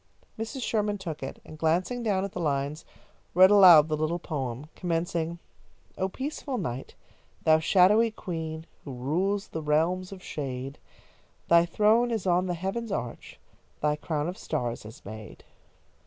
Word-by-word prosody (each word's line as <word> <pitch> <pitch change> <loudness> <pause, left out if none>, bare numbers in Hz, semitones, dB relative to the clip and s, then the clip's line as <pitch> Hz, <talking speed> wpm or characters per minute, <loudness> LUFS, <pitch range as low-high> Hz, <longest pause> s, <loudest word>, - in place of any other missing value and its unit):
Mrs. 235 +4 -4
Sherman 210 -2 0
took 170 -6 -6
it, 135 - -6
and, 155 - -11
glancing 180 +10 +1
down 200 -4 0
the 185 - -7
lines, 145 -1 -1 0.5
read 185 +2 +8
aloud 180 -7 +9
the 155 - 0
little 155 +3 -1
poem, 135 -6 -4
commencing: 170 -1 -2 0.6
"Oh, 190 - -1
peaceful 270 +2 -4
Night, 125 - -5 0.5
thou 155 0 +5
shadowy 200 +7 +5
Queen 160 -6 -5 0.2
Who 140 - -7
rules 180 +11 -1
the 160 - -4
realms 165 +5 +1
of 190 -1 -10
shade, 135 -1 -5 0.7
Thy 170 0 +6
throne 215 +7 +3
is 225 -5 -2
on 180 0 +2
the 175 - -1
heaven's 195 +6 -3
arch, 120 -10 -5 0.4
Thy 150 0 +1
crown 150 0 -2
of 180 - -5
stars 120 -8 -3
is 110 - -12
made." 110 +1 -10
170 Hz, 150 wpm, -27 LUFS, 150-195 Hz, 0.7 s, aloud